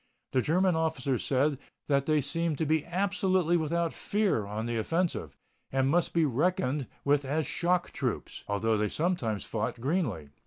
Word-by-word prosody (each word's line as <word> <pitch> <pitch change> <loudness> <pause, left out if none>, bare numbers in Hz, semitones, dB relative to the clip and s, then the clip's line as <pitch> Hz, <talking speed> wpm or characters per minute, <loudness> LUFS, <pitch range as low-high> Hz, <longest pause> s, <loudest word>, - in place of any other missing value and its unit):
The 130 - +2
German 180 +5 +2
officer 160 -6 0
said 140 +1 +1 0.3
that 140 -1 +1
they 155 -1 +3
seemed 160 +2 -1
to 160 - 0
be 155 0 +2
absolutely 185 -1 +1
without 170 +1 0
fear 200 - 0
on 105 +2 -3
the 120 0 -1
offensive, 165 - -1 0.3
and 135 0 +2
must 175 +1 +2
be 165 -2 +3
reckoned 150 - 0 0.2
with 145 0 +3
as 150 +3 -1
shock 175 +1 0
troops, - - -3
although 110 +2 +1
they 105 0 0
sometimes 150 - -1
fought 115 +2 -3
greenly. 120 - -1
150 Hz, 160 wpm, -29 LUFS, 125-170 Hz, 0.3 s, they